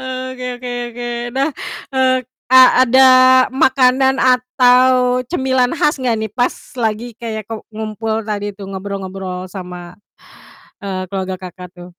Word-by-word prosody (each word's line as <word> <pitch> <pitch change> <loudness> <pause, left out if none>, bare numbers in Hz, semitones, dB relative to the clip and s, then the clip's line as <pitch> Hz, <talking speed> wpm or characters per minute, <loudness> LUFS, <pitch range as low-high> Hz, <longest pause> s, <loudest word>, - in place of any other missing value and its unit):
Eee, 260 0 -5
oke 255 0 -7
oke 245 0 -7 0.2
oke. 240 +1 -6 0.3
Nah, 275 +2 +1 0.4
eee, 260 -1 +2 0.3
a 260 +1 +7 0.2
ada 260 +2 +5 0.5
makanan 260 0 +3
atau 250 0 +3
cemilan 260 -5 0
khas 295 0 +1
enggak 245 -3 0
nih 220 -1 -4
pas 245 +2 0 0.2
lagi 230 0 -2
kayak 220 -2 -6
ku 225 -1 -6
ngumpul 220 +1 -4
tadi 205 -1 -4
tuh, 200 - -9
ngobrol-ngobrol 190 -1 -6
sama, 180 -2 -9 0.8
eee, 195 -3 -4
keluarga 190 -1 -3
Kakak 180 0 -10
tuh? 175 0 -12
240 Hz, 135 wpm, -17 LUFS, 200-255 Hz, 0.8 s, a